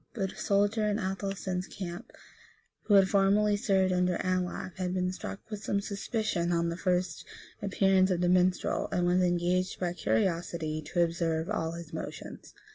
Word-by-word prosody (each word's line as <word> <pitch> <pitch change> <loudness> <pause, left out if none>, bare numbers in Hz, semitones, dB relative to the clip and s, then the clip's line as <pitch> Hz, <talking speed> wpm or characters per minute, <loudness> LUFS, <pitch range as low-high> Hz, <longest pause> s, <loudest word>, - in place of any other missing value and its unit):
But 195 -4 -1
a - - -14
soldier 205 +2 +1
in 205 0 +1
Athelstan's 190 -2 -3
camp, 175 -3 -7 0.7
who 205 - +4
had 195 -1 +7
formerly 205 +1 +3
served 190 -2 +2
under 180 -1 +1
Anlaf, 185 0 -2
had 180 0 -2
been 180 0 0
struck 195 - -6
with 210 0 -5
some 200 - 0
suspicion 200 -3 -2
on 170 0 +1
the 170 - -3
first 180 -2 -1 0.4
appearance 195 -1 +3
of 180 -2 0
the 180 - +2
minstrel, 180 0 +2
and 180 - +1
was 180 +1 +3
engaged 180 +1 +1
by 175 -2 -1
curiosity 165 - -1
to 175 +2 +1
observe 165 +1 -1
all 165 -6 -1
his 170 -1 -9
motions. - - -7
185 Hz, 165 wpm, -30 LUFS, 175-195 Hz, 0.7 s, had